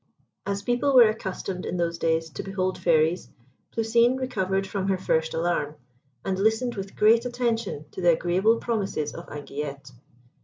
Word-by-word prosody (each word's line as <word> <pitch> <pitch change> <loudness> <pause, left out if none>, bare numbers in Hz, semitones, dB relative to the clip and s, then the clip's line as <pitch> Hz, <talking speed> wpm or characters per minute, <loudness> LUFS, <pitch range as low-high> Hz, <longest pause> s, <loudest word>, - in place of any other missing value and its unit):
As 200 0 -2
people 245 +5 +1
were 240 -3 +8
accustomed 190 -3 -4
in - - -3
those 170 -1 -1
days 160 0 0
to 135 - -5
behold 185 -1 -2
Fairies, 160 +1 +2 0.4
Plousine 235 +3 +2
recovered 195 -7 -1
from 195 0 -3
her 190 -1 +1
first 160 -3 0
alarm, 160 -3 -1 0.5
and 190 -1 -1
listened 220 +4 +1
with 195 -1 -7
great 225 +2 +5
attention 235 - -2
to - - -7
the 175 -1 +5
agreeable 185 +7 +2
promises 200 -11 -2
of - - -9
Anguillette. 140 -2 -6
190 Hz, 155 wpm, -25 LUFS, 170-225 Hz, 0.5 s, were